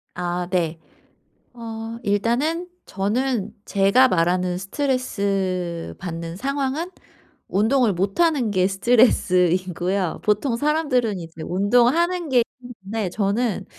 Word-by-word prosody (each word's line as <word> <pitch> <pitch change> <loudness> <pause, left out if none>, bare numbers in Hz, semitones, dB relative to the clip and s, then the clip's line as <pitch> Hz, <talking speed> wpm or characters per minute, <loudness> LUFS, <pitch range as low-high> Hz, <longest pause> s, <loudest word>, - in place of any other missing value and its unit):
아 175 0 -2
네. 170 -3 0 0.7
어 225 -1 -7
일단은 250 - 0 0.2
저는 215 +2 -1
제가 200 +6 +4
말하는 180 -2 +1
스트레스 195 - -2
받는 165 -1 -6
상황은 275 - -2 0.6
운동을 225 +3 +3
못하는 235 - +1
게 185 -2 +2
스트레스이고요. 185 -4 +2
보통 215 +4 +1
사람들은 255 - +1
이제 165 -1 -10
운동하는 245 - +2
게 250 -3 +4 0.2
힘든데 220 -4 -5
저는 210 +2 -1
205 Hz, 235 characters per minute, -22 LUFS, 185-255 Hz, 0.7 s, 제가